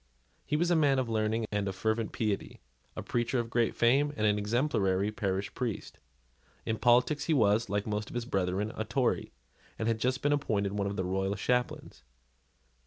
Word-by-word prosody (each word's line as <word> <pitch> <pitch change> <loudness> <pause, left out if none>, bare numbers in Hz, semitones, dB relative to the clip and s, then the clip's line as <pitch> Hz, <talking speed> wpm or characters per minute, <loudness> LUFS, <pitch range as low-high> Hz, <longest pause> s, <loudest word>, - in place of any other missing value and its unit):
He - - 0
was 175 +2 +1
a - - +4
man 145 -4 +3
of 130 -3 0
learning 110 0 0
and 100 -1 -1
fervent 110 +2 -1
piety, 105 -3 -2 0.4
a - - -5
preacher 120 +2 -1
of 115 -1 -2
great 115 -1 +1
fame, 135 +5 +3
and 110 - +1
an 105 0 +3
exemplary 105 -4 +1
parish 100 -2 -2
priest. 120 -5 -4 0.7
In 110 -1 -2
politics 125 +5 +3
he 160 - +2
was, 110 -3 +3
like 100 +1 -1
most 105 0 -3
of - - -10
his 120 -1 -2
brethren, 95 -1 -1
a 110 - -2
Tory, 115 +4 0 0.5
and 110 - -2
had 115 -1 +1
just 130 +3 0
been 145 0 +3
appointed 105 -9 0
one 100 -1 -1
of 100 - -3
the 95 - -2
royal 95 +2 -1
chaplains. 125 - -2
110 Hz, 185 wpm, -30 LUFS, 100-125 Hz, 0.7 s, a